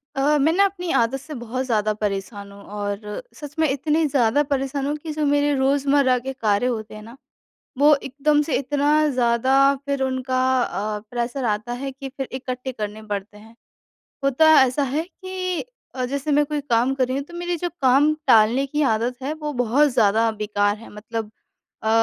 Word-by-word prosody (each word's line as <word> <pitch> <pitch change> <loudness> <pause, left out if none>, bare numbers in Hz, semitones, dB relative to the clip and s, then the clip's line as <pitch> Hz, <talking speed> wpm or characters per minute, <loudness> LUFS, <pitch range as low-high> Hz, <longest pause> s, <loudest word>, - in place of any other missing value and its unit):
अ, 290 +2 +2
मैं 315 +4 +4
ना 395 +2 +4
अपनी 360 -3 -3
आदत 235 +3 +1
से 305 +3 -10
बहुत 245 +3 -4
ज़्यादा 215 -3 +1
परेशान 200 0 -4
हूँ, 200 0 -13
और 205 0 -5
सच 295 -1 -10
में 315 - +4
इतनी 300 +4 +1
ज़्यादा 275 0 +2
परेशान 270 0 -1
हूँ 295 - -1
कि 315 +1 -7
जो 305 -1 -1
मेरे 290 0 +2
रोज़मर्रा 275 -1 +2
के 265 +2 -5
कार्य 215 -3 0
होते 220 -3 -4
हैं 215 - -9
ना, 230 +3 -12 0.6
वो 295 +2 +6
एकदम 285 +2 0
से 300 -1 -1
इतना 290 +2 +2
ज़्यादा 250 0 +2 0.3
फिर 280 -1 -1
उनका 260 0 -1 0.2
अ, 210 -2 -3
प्रेशर 245 +2 -3
आता 215 +1 -1
है 270 +3 -4
कि 270 +1 -8
फिर 270 0 -6
इकट्ठे 255 0 -5
करने 215 -2 -6
पड़ते 200 +1 -5
हैं। 220 +2 -16 0.7
होता 275 +4 +4
ऐसा 265 +2 +1
है 280 +3 -1
कि 370 -1 -5 0.3
अ, 255 -1 -2
जैसे 280 +3 -3
मैं 295 +1 +4
कोई 300 0 -2
काम 255 -1 +1
कर 260 -2 +1
रही 255 - -2
हूँ, 280 - -3
तो 345 - -14
मेरी 350 0 -2
जो - - +1
काम 275 +3 +4
टालने 230 +5 +4
की 295 +2 -1
आदत 235 +3 -1
है, 280 - -2
वो 300 -1 -5
बहुत 280 +6 +3
ज़्यादा 225 0 +3
बेकार 205 0 +1
है। 230 - -12
मतलब 220 +1 -6 0.5
अ, 220 - -1
265 Hz, 190 wpm, -22 LUFS, 225-290 Hz, 0.7 s, वो